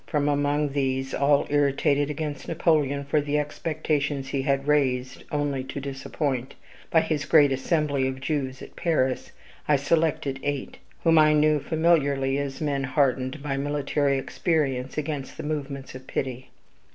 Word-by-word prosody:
From 145 -3 0
among 145 +1 +1
these, 135 -1 -1
all 140 +1 +3
irritated 145 0 +2
against 150 -1 -4
Napoleon 150 -4 +1
for 150 +2 +2
the 145 +1 -1
expectations 150 -2 -2
he 135 - -1
had 135 +1 0
raised, 130 -4 +1
only 145 -3 -1
to 135 +1 -5
disappoint, 135 -1 -3 0.3
by 160 - +4
his 155 -2 -1
great 150 -3 +5
assembly 140 0 +1
of 130 0 -4
Jews 135 -2 -3
at - - -12
Paris, 130 -7 0 0.4
I 150 - +5
selected 140 -2 0
eight, 145 -2 -3 0.2
whom 165 -1 +5
I 155 0 +6
knew 150 0 +4
familiarly 140 -4 +2
as 140 -1 -4
men 140 -3 0
hardened 130 +1 0
by 140 -2 -2
military 145 0 0
experience 135 -3 -1
against 150 -3 -4
the - - -5
movements 140 -3 -4
of 130 0 -10
pity. 130 -1 -4
145 Hz, 150 wpm, -25 LUFS, 135-150 Hz, 0.4 s, I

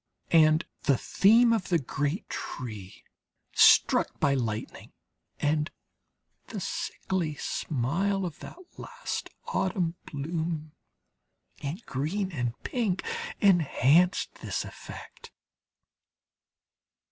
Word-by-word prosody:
And 155 0 +5 0.2
the 140 -3 +4
theme 230 - +5
of 215 -4 -1
the 175 - +4
great 145 +4 -2
tree 105 -7 -7 0.5
struck - - +5
by 140 - +3
lightning, 115 -5 -3 0.5
and 150 +1 +1 0.8
the - - -5
sickly 170 -5 -2
smile 170 +10 -1
of 165 -5 -6
that - - -10 0.2
last 485 +1 -5 0.2
autumn 180 -3 0
bloom 155 +1 -3 0.9
in 150 +8 -4
green 185 +9 -2
and 125 -6 -2
pink, 220 -7 -1 0.4
enhanced 175 - +4
this - - -2
effect. - - -11
160 Hz, 90 wpm, -28 LUFS, 140-190 Hz, 0.9 s, And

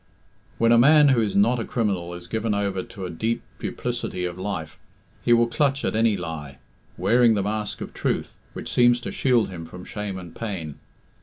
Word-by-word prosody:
When 115 0 +3
a 115 - +6
man 150 +3 +7
who 125 -4 +4
is 105 -3 -1
not 115 +5 +4
a - - -1
criminal 95 -8 -2
is 90 0 -10
given 110 +3 -1
over 100 -2 -1
to 95 0 -8
a 90 - -5
deep 110 +8 -2 0.2
duplicity 90 -1 -3
of 90 -1 -4
life, 85 -6 -4 0.4
he 120 - +1
will 120 0 +6
clutch 140 +2 0
at - - -1
any 110 -2 +3
lie, 80 -6 -6 0.4
wearing 120 -1 +4
the 100 - 0
mask 105 +1 -3
of - - -6
truth, - - -2
which - - -5
seems 120 0 +5
to - - -5
shield 125 -6 +2
him 90 -3 -7
from 90 +2 -10
shame 105 -2 -5
and 90 -3 -10
pain. 90 -10 -5
105 Hz, 200 wpm, -24 LUFS, 90-115 Hz, 0.4 s, man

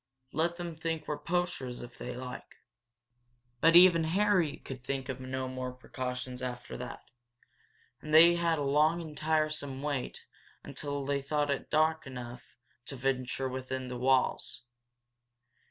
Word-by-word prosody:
Let 170 +3 0
them 170 -2 -5
think 160 -1 -3
we're 150 -1 -2
poachers, 165 -7 -2
if 120 0 -12
they 125 0 -5
like." 125 0 -8 1.0
But 165 +5 +5
even 175 -2 +8
Harry 185 -2 +2
could 130 -2 -9
think 135 0 -3
of 130 -1 -4
no 130 0 -3
more 130 -1 -4
precautions 125 -1 -5
after 125 -1 -5
that, - - -7 1.0
and 155 - -7
they 165 +2 +9
had 170 -1 +1
a 145 - -1
long 150 +4 +3
and 160 -3 -7
tiresome 155 -3 0
wait 145 -4 -3 0.4
until 145 -1 -4
they 140 0 0
thought 145 +1 0
it 140 - +1
was - - -19
dark 155 0 +2
enough 125 -3 -9 0.3
to 140 - -5
venture 130 0 -1
within 130 0 -4
the 125 - -4
walls. 130 -2 +1
140 Hz, 150 wpm, -31 LUFS, 130-160 Hz, 1.0 s, they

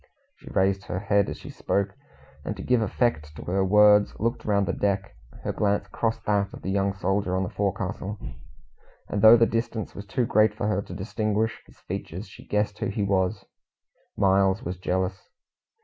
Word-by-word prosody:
She - - -13
raised 95 0 +1
her - - -3
head 100 0 +2
as - - -5
she - - -10
spoke, 100 0 -1 0.5
and - - -3
to - - -6
give 125 -2 +2
effect 85 -9 0
to - - -8
her 95 +2 0
words, 105 +1 +5
looked 115 +4 -1
round 100 -2 +2
the - - 0
deck. 100 -1 -1 0.3
Her - - -1
glance 100 -1 0
crossed 115 -1 -2
that 100 -1 +1
of - - -10
the 95 - -2
young 100 0 +1
soldier 95 0 0
on 95 - +1
the 95 - -4
forecastle, 100 0 -2 0.9
and 100 - -2
though 110 +2 +9
the 115 - +5
distance 115 -1 -2
was 100 0 -9
too 120 +4 0
great 110 -1 +3
for 110 - -3
her 105 -2 +1
to 90 - -9
distinguish 110 +2 -1
his - - -20
features, 90 +6 -6
she 100 - -14
guessed 105 0 0
who - - -1
he 100 +1 -2
was 95 -2 0 0.7
Miles 95 0 +3
was 90 +2 -4
jealous. 95 +1 -2
100 Hz, 190 wpm, -26 LUFS, 95-105 Hz, 0.9 s, though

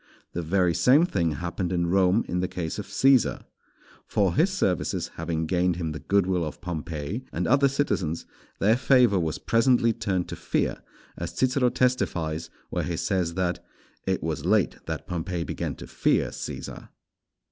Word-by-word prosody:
The 85 - -2
very 90 +1 +2
same 135 - +5
thing 85 - 0
happened 90 +2 -3
in 85 -1 +1
Rome 95 +4 +3
in 90 - -1
the 90 - 0
case 85 -3 -4
of - - -6
Cæsar. 135 -2 +3 0.6
For 95 -4 +1
his 170 - +3
services 95 - 0
having 80 0 -2
gained 90 +1 +1
him 85 -2 -3
the 75 - -5
good 100 -2 +2
will 90 -2 0
of 75 - -5
Pompey 85 - -4
and 90 - -2
other 140 +3 +4
citizens, 100 - -1 0.3
their 110 +3 +4
favour 125 -6 +4
was 80 -3 -1
presently 115 0 +3
turned 100 -6 -1
to - - -4
fear, - - -1 0.4
as - - -6
Cicero 130 -1 +3
testifies 85 -12 0 0.2
where - - -1
he 85 -2 -3
says 90 -3 -1
that 90 -1 -1 0.4
"it 95 -1 0
was 80 -1 -2
late 100 +1 +2
that 80 -1 -4
Pompey 90 -1 -3
began - - -4
to - - -9
fear - - +1
Cæsar." - - -7
90 Hz, 170 wpm, -26 LUFS, 85-115 Hz, 0.6 s, same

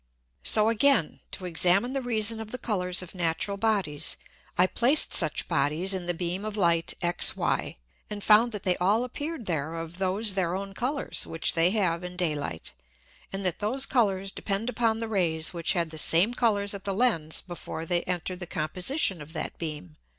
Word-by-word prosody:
So 215 - +3
again, 230 - +3
to 185 - -6
examine 180 +8 +2
the 270 - -1
reason 225 -2 0
of 220 -1 -7
the 255 - -5
Colours 185 -7 -1
of 180 - -11
natural 175 +3 -1
Bodies, 195 -8 0 0.4
I 180 - +5
placed 250 +10 +4
such 155 -5 +3
Bodies 155 +8 +1
in 180 -2 -4
the 175 - -1
Beam 180 +3 -2
of 215 0 -4
Light 170 -3 +2
XY, 175 0 +1 0.3
and 205 -1 -6
found 220 +3 +5
that 210 -3 -6
they 180 -1 +2
all 205 +6 +2
appeared 285 +1 -5
there 160 -2 -2
of 165 +2 -7
those 195 +3 0
their 180 -2 -1
own 195 0 -5
Colours 265 +7 -2
which 165 - -1
they 165 +1 +3
have 185 -5 0
in 180 0 -7
Day 175 -4 +1
light, 140 - -4 0.6
and 195 0 -5
that 180 - -1
those 250 +6 0
Colours 195 -6 0
depend 210 +5 -2
upon 225 -2 +1
the 230 0 -4
Rays 170 -7 0
which 170 +1 0
had 170 -4 -1
the 160 - -2
same 175 +10 +4
Colours 205 -5 +1
at 200 -1 -7
the 195 -1 -2
Lens 180 -10 +1
before 170 -2 -6
they 175 +1 +1
enter'd 180 0 -3
the 175 - -6
Composition 180 - 0
of 150 +2 -11
that 160 - -4
beam. 150 - -6
190 Hz, 190 wpm, -27 LUFS, 170-220 Hz, 0.6 s, I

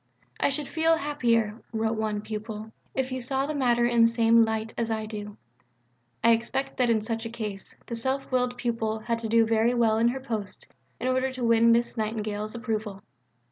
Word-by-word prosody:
"I - - +3
should 280 +1 -2
feel 325 0 +2
happier," 235 -7 0
wrote 225 0 0
one 215 -1 -1
pupil, 215 0 -6 0.2
"if 265 -1 -1
you 260 0 -3
saw 265 +2 -1
the 305 - -3
matter 240 -4 +2
in 240 -1 +3
the 230 - +8
same 230 0 +4
light 220 0 -2
as 230 -1 -1
I 220 -1 -1
do." 210 -1 -7 0.9
I 230 - +6
expect 235 +4 -1
that 250 -2 +2
in 225 -2 +3
such 225 0 -3
a 230 - -4
case 210 -4 -6
the - - -7
self 265 +4 -2
willed 250 -1 +1
pupil 225 -3 -1
had 230 +1 -2
to 225 -1 -4
do 230 0 +5
very 225 +2 +2
well 225 -2 +3
in 230 - +4
her 255 +3 0
post 220 -7 -5 0.3
in 255 - -2
order 260 +1 +1
to 255 -1 -5
win 230 0 +5
Miss 235 +1 +1
Nightingale's 215 0 -3
approval. 215 -4 -3
230 Hz, 200 wpm, -27 LUFS, 220-245 Hz, 0.9 s, the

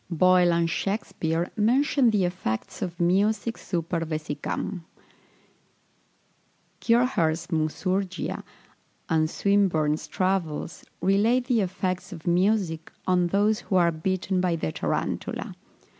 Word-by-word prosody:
Boyle 180 +1 +4
and 170 0 +2
Shakspeare 170 -2 -2
mention 250 +4 +3
the 205 -4 +2
effects 175 - -4
of 180 -3 -4
music 205 +6 +2
super 170 -1 -3
vesicam. 155 +3 -4 2.0
Kircher's 180 -9 +1
"Musurgia," 180 +3 -1 0.7
and 155 -1 +2
Swinburne's 170 -7 +1
Travels, 180 -3 -2 0.2
relate 220 +6 +3
the 245 -4 +2
effects 185 -1 -2
of 165 -4 -9
music 180 -2 +1
on 180 -1 +2
those 205 +4 +2
who 190 - -3
are 170 -2 +4
bitten 185 +3 -1
by 180 -2 +1
the 120 - -2
tarantula. - - -3
180 Hz, 105 wpm, -26 LUFS, 165-200 Hz, 2.0 s, Boyle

